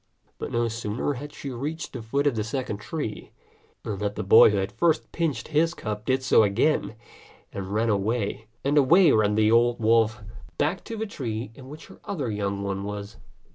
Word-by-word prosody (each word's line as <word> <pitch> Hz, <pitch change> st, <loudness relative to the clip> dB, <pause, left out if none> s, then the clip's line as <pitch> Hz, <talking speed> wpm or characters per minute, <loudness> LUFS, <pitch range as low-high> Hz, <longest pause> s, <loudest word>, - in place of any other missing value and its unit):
But -, -, -5 dB
no 120 Hz, 0 st, +1 dB
sooner 115 Hz, +4 st, -2 dB
had 145 Hz, +3 st, -7 dB
she 140 Hz, -, -7 dB
reached 150 Hz, +7 st, -5 dB
the 125 Hz, -, -5 dB
foot 140 Hz, +6 st, -1 dB
of 140 Hz, -4 st, +2 dB
the 110 Hz, -, -1 dB
second 115 Hz, -1 st, -3 dB
tree, 110 Hz, +1 st, -6 dB, 0.5 s
than 105 Hz, -4 st, -4 dB
the 105 Hz, +1 st, -2 dB
boy 110 Hz, +5 st, +8 dB
who 105 Hz, -, 0 dB
had 95 Hz, 0 st, -1 dB
first 165 Hz, -2 st, +1 dB
pinched 155 Hz, -9 st, -2 dB
his 165 Hz, +3 st, +2 dB
cub 105 Hz, -1 st, -5 dB
did 130 Hz, 0 st, +1 dB
so 130 Hz, -, +5 dB
again, 110 Hz, +5 st, +1 dB, 0.6 s
and 95 Hz, -1 st, -5 dB, 0.2 s
away 105 Hz, +1 st, -1 dB, 0.2 s
ran 140 Hz, -, +4 dB
the 110 Hz, 0 st, +3 dB
old 120 Hz, +1 st, +3 dB
wolf 110 Hz, -1 st, +2 dB, 0.3 s
back 165 Hz, +5 st, 0 dB
to 225 Hz, -, -6 dB
the 220 Hz, -, -2 dB
tree 115 Hz, -, -5 dB
in 130 Hz, +1 st, -13 dB
which 150 Hz, +2 st, -10 dB
her -, -, -15 dB
other 145 Hz, -, -3 dB
young 100 Hz, -1 st, -2 dB
one 100 Hz, 0 st, -3 dB
was. 105 Hz, +1 st, -6 dB
115 Hz, 180 wpm, -25 LUFS, 105-145 Hz, 0.6 s, boy